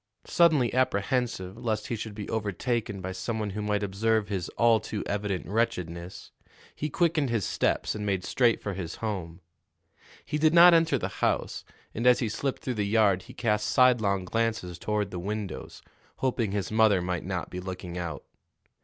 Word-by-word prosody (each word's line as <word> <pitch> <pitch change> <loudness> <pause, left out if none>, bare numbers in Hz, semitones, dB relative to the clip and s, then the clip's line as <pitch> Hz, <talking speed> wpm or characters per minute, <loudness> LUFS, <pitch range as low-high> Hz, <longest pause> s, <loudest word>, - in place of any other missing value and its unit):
Suddenly 155 -8 +3
apprehensive 115 -4 0
lest 110 -3 -2
he 120 - -1
should 110 -1 -6
be 105 -1 -6
overtaken 110 0 -2
by 95 +1 -4
some 110 +5 -3
one 105 -2 -2
who 105 +2 -4
might 105 0 0
observe 105 +1 0
his 95 -4 -3
all 115 0 +5
too 105 - -5
evident 100 -3 -2
wretchedness, 90 -5 -3 0.4
he 150 - -3
quickened 165 -5 +1
his 115 -5 0
steps - - 0
and 105 - -5
made 95 -3 -1
straight 120 +1 +2
for 100 - -3
his 90 -3 -5
home. 95 -6 -5 0.8
He 150 - -2
did 155 +2 +4
not 175 +1 +9
enter 165 -4 +4
the - - -2
house, - - 0 0.3
and 115 +3 0
as 125 - +7
he 115 - -1
slipped 135 +5 -3
through 130 - -2
the - - +1
yard 100 -3 +3
he - - -9
cast 105 -3 0
sidelong 110 -8 +3
glances 110 -5 -2
toward 105 0 -1
the 90 - -4
windows, 105 +2 -5 0.3
hoping 120 -5 -1
his 100 0 -2
mother 110 -3 +4
might 90 -2 -2
not 95 -2 -4
be 90 - -5
looking 90 -1 -6
out. 85 -4 -5
105 Hz, 180 wpm, -28 LUFS, 95-120 Hz, 0.8 s, not